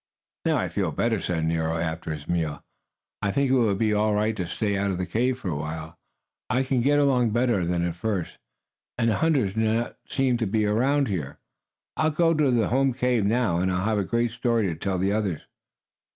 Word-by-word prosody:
"Now - - +2
I - - 0
feel - - -1
better!" - - 0
said 80 -3 -1
Nero, 80 0 0
after 80 0 -3
his 75 -2 -6
meal. 80 -4 -2 0.6
"I 100 - 0
think 140 +3 +1
it - - +4
will 115 -6 +3
be 110 +1 +1
all 105 0 +2
right 105 +1 +1
to 90 -5 -3
stay 100 +3 -1
out 100 0 0
of 95 - -1
the 90 - -2
cave 125 +8 0
for 110 -8 -5
a 80 - -2
while. 80 +2 -5 0.5
I 130 +1 +2
can 130 -2 0
get 145 +4 +3
along 130 -5 +3
better 120 -3 +1
than 85 0 0
at 85 - -2
first, 95 -1 -3 0.6
and 115 -1 +2
the - - 0
hunters 140 -12 +1
do 110 - -3
not 110 +2 0
seem 130 -3 +1
to 115 -2 -1
be 105 +2 +1
around 135 +7 +2
here. 80 -9 -4 0.6
I'll 155 - +2
go 165 +2 +2
to 150 -3 +2
the 120 -4 +2
home 135 +1 +2
cave 125 -4 +1
now, 110 -6 +1
and 95 +1 +1
I'll 90 +1 -1
have 110 -1 +1
a - - +1
great 115 +4 0
story 115 -2 0
to 80 - -3
tell 95 +3 -2
the 95 +3 +1
others." 100 -7 -1
110 Hz, 225 wpm, -25 LUFS, 90-125 Hz, 0.6 s, it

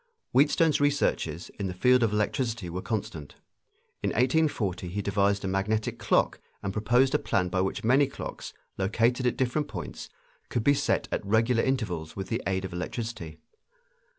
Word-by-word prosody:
Wheatstone's 150 +2 +3
researches 115 - 0
in 100 - -1
the 90 - -5
field 125 +6 +4
of 115 -3 +2
electricity 105 -2 -1
were 90 +2 -4
constant. 95 - -4 0.7
In - - 0
1840 125 - +1
he 90 +4 -4
devised 100 0 +1
a - - -1
magnetic 105 +3 -1
clock - - +2 0.2
and 95 -1 -2
proposed 120 +5 +3
a - - +3
plan 90 -2 0
by 95 +1 0
which 95 - -2
many 130 +5 +4
clocks, - - -7 0.3
located 115 +6 +2
at 125 - 0
different 135 +4 0
points, 90 -9 -7 0.4
could 120 - -1
be 140 - +5
set 140 - 0
at - - -1
regular 115 +3 +2
intervals 100 -12 -2
with 95 -1 -5
the 115 +2 -1
aid 95 -1 -1
of 95 - -7
electricity. 90 -2 -5
110 Hz, 165 wpm, -28 LUFS, 95-125 Hz, 0.7 s, be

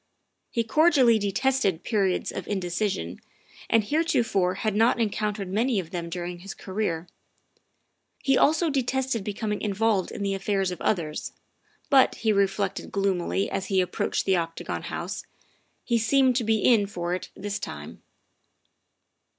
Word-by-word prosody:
He 230 - 0
cordially 260 -3 +4
detested 205 -3 +1
periods 195 -5 0
of 190 - -5
indeci 190 +1 -1
sion, 85 - -5 0.5
and 225 -1 +4
heretofore 225 - +1
had 215 +1 -1
not 230 +3 +3
encountered 210 -2 -1
many 220 +4 +1
of 170 -2 -6
them 170 -2 -4
during 175 0 -5
his 195 +2 -8
career; 185 -4 -3 1.2
he 270 -1 +3
also 320 +4 +3
detested 265 -4 0
becoming 210 +1 -3
involved 210 -1 +1
in - - -5
the 200 0 0
affairs 195 -1 0
of 180 - -7
others, 160 -7 -1 0.6
but, 270 -2 +5
he 220 -1 +1
reflected 195 0 0
gloomily 195 -1 0
as 195 - -3
he 190 -2 +2
approached 180 - -1
the 190 - +3
Octagon 165 -1 -3
House, - - -5 0.6
he 235 -1 +1
seemed 260 +3 +3
to 245 - 0
be 220 0 +2
in 220 -5 +5
for 175 -3 -3
it 185 - -4
this 205 0 -4
time. - - -8
205 Hz, 145 wpm, -26 LUFS, 185-230 Hz, 1.2 s, but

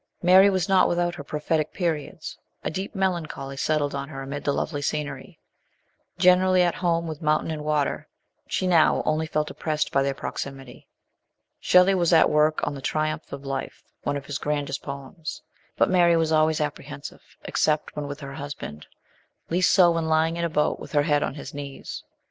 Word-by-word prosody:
Mary 190 +3 +7
was 190 -1 0
not 190 -1 +5
without 175 0 0
her 145 - -7
prophetic 150 +1 -1
periods 165 -5 -3 0.3
a - - -2
deep 190 +6 -5
melancholy 165 -8 -2
settled 145 0 0
on 140 +1 -4
her 135 -3 -6
amid 140 +1 -5
the 145 - +1
lovely 145 +1 -2
scenery. 145 -2 -4 0.8
Generally 185 0 +5
at 175 - +2
home 170 -2 0
with 155 -2 -6
mountain 155 +1 +1
and 155 -1 -4
water, 150 -2 -1 0.4
she - - -1
now 170 -4 +4
only 155 +1 0
felt 150 0 -1
oppressed 155 -1 -2
by 135 - +3
their 135 0 0
proxi 140 - -4
mity. 135 -2 -13 0.7
Shelley 180 +2 +5
was 175 -2 +2
at 165 - +6
work 150 +1 +2
on - - -2
the 140 - -7
Triumph 155 +2 -2
of 140 0 -7
Life, 135 -1 -5 0.2
one 145 0 -1
of 140 - -8
his 140 0 -4
grandest 145 -2 -2
poems; 140 +4 -7 0.3
but - - +4
Mary 175 -2 +4
was 160 -1 +1
always 155 0 +3
apprehensive 150 - -5 0.2
except 155 0 0
when 150 -1 -4
with 145 +1 -7
her 140 0 -7
husband, 140 - -7 0.6
least 185 +2 +3
so 180 -3 +6
when 165 -1 -1
lying 160 +1 +2
in 170 - -2
a 170 - 0
boat 150 -1 0
with - - -10
her 145 -1 +4
head 145 -1 +2
on 135 - -2
his 145 - -8
knees. 140 -1 -7
155 Hz, 190 wpm, -25 LUFS, 145-170 Hz, 0.8 s, Mary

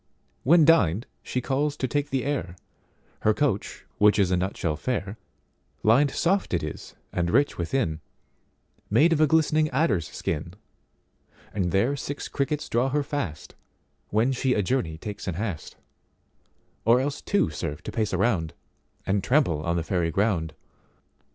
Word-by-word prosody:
When 160 +3 +5
dined 115 - +4 0.2
she 125 - -3
calls, 145 +3 -1
to 130 - -1
take 145 +2 -1
the 130 -1 -1
air, 135 -12 -2 0.6
Her 110 0 +2
coach 130 -9 -1
which 105 0 +5
is 95 -3 +2
a - - +3
nutshell 90 -3 -1
fair; 100 +1 -3 0.6
Lined 130 +7 +5
soft 175 - 0
it 85 - -1
is 75 - -7 0.2
and 85 -1 0
rich 140 +4 +2
within, 85 -3 -1 0.9
Made 150 +11 +4
of 155 - +1
a 155 - +6
glistening 155 0 +3
adders 125 - +1
skin, 85 +3 -4 1.0
And 95 -4 -1
there 115 - +2
six 145 +1 -5
crickets 145 +2 -2
draw 120 +3 +1
her 145 +2 0
fast, 140 - -4 0.6
When 110 +5 +2
she 130 0 +1
a 105 - +1
journey 90 -8 -1
takes 105 +4 -7
in 90 - -2
haste:Or 105 +4 -4
else 140 +2 -2
two 200 - +1
serve 75 -1 -5
to - - -5
pace 110 -2 -1
a 95 - 0
round, 95 -6 0 0.5
And 95 0 0
trample 125 - +2
on 85 +2 -1
the 85 - -1
Fairy 85 0 0
ground. 90 -3 0
110 Hz, 155 wpm, -26 LUFS, 90-140 Hz, 1.0 s, a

